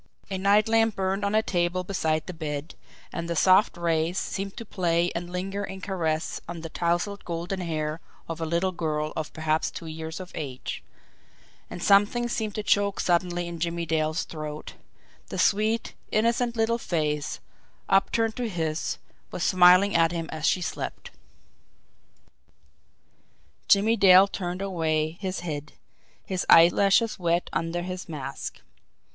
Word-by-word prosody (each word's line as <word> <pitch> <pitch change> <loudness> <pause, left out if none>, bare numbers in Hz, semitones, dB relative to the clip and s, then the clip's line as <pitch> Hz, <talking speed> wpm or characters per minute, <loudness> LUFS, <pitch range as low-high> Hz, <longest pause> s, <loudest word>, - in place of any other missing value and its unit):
A 190 - -2
night 205 +2 +4
lamp 225 -1 +3
burned 195 +1 -1
on 200 +1 0
a 220 - +4
table 175 -1 0
beside 160 -5 -1
the 180 - -6
bed, 150 -1 -5 0.4
and 170 0 -4
the 170 - -1
soft 185 +3 +4
rays 170 +1 0
seemed 195 0 -3
to 230 - -6
play 175 -3 0
and 175 +1 -4
linger 195 +3 -3
in 190 -1 -6
caress 165 -5 -2
on 170 -1 -6
the 165 - -6
tousled 175 +5 -1
golden 175 +3 -4
hair 155 -2 -3 0.3
of 165 0 -5
a - - 0
little 170 +3 +1
girl 155 -3 -2
of 155 -1 -4
perhaps 155 0 0
two - - -8
years 160 +1 -6
of 185 -1 -8
age 135 -4 -5 0.9
and 175 - -7
something 205 +4 +4
seemed 220 -3 -3
to 215 - -3
choke 200 -1 +2
suddenly 175 0 +1
in 170 -1 -6
Jimmie 170 0 -2
Dale's 155 0 0
throat 155 -1 -7 0.5
the - - -6
sweet, 215 +2 +1 0.2
innocent 235 +2 +1
little 230 +1 +1
face, 150 -7 -2 0.5
upturned 220 +3 +2
to 245 -2 -2
his, 160 -4 -2 0.3
was 175 - -4
smiling 185 +2 +6
at 165 0 +4
him 165 -1 -3
as 155 -1 -1
she 185 - +2
slept. - - -5 2.6
Jimmie 215 +3 +4
Dale 190 -1 +8
turned 180 -1 -4
away 160 -3 -1
his 190 -2 -3
head 150 -3 -5 0.5
his 185 -2 -2
eyelashes 195 +7 +5
wet 170 0 0
under 170 +1 -1
his 180 -1 -6
mask. 140 -3 -6
175 Hz, 150 wpm, -26 LUFS, 160-195 Hz, 2.6 s, Dale